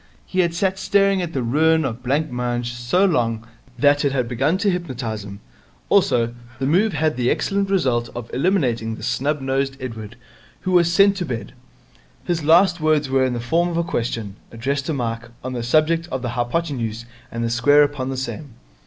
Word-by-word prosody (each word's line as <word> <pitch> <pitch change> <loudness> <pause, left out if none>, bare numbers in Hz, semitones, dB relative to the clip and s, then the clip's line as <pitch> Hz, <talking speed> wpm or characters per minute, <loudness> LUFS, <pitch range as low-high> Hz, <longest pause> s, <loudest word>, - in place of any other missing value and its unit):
He 185 - -3
had 170 -2 +2
sat 190 +1 0
staring 195 0 +2
at 170 -2 -4
the 130 - -1
ruin 160 +6 +3
of 120 -4 -3
the - - -24
blancmange 125 -3 -1
so 120 +11 +1
long 115 - 0 0.3
that 145 0 +3
it 140 - +2
had 125 -3 0
begun 135 +8 +1
to 200 0 +1
hypnotize 125 - -4
him. 100 0 -10 0.5
Also, 120 -1 +3 0.2
the 135 - -2
move 190 +8 +2
had 155 0 0
the 125 0 +1
excellent 200 -1 0
result 125 -11 +1
of 120 -1 -6
eliminating 125 - 0
the 110 - -11
snub 135 +5 -1
nosed 135 0 -1
Edward, 115 -4 -7 0.5
who 185 - -2
was 170 -2 +4
sent 195 +2 +4
to 180 - -2
bed. 115 -5 -5 0.7
His 170 -3 -1
last 175 +3 +5
words 155 -3 +2
were 135 0 +3
in 130 -1 0
the 120 - -3
form 165 +9 +1
of 170 - -3
a 170 - +1
question, 115 -9 -3
addressed 140 +5 -2
to 160 - -1
Mike, 115 -2 -3
on 130 0 -4
the 120 - -3
subject 155 +7 +2
of 130 -1 -3
the 120 - -2
hypotenuse 120 -2 -2 0.3
and 115 0 -3
the 115 - -1
square 145 +5 +5
upon 145 -3 -2
the 135 - -3
same. 130 0 -6
135 Hz, 195 wpm, -21 LUFS, 120-165 Hz, 0.7 s, last